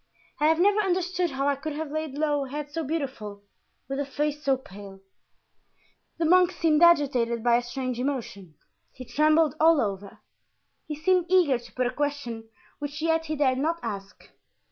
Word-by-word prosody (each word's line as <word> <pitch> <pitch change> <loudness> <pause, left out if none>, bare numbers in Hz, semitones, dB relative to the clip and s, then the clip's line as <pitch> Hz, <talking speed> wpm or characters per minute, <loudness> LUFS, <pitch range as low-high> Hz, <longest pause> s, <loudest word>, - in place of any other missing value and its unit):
I 300 - +3
have 320 +1 +3
never 405 +3 +4
understood 365 -2 0
how 275 0 -2
I 285 - +2
could 305 +2 -5
have 305 0 -5
laid 310 -2 -4
low 295 -2 0
a - - -10
head 295 +1 -5
so 325 +2 -3
beautiful, 260 -10 -4 0.4
with 270 +1 -3
a - - +1
face 295 +1 -2
so 270 -1 +2
pale." 200 -5 -12 1.2
The 330 - 0
monk 360 +2 +5
seemed 325 -3 +1
agitated 265 -9 +3
by 240 -1 +4
a - - 0
strange 250 0 -4
emotion; 230 - -4 0.4
he 255 - -10
trembled 310 +3 +3
all 320 -1 +5
over; 200 -3 -3 0.7
he 300 - -4
seemed 350 +3 +1
eager 345 -9 +4
to 240 0 -15
put 255 - -1
a 245 - 0
question 250 -6 -3 0.3
which 290 +1 -5
yet 325 0 +1
he 310 - -2
dared 260 -3 +1
not 325 +4 0
ask. 200 -3 -7
290 Hz, 180 wpm, -26 LUFS, 245-320 Hz, 1.2 s, monk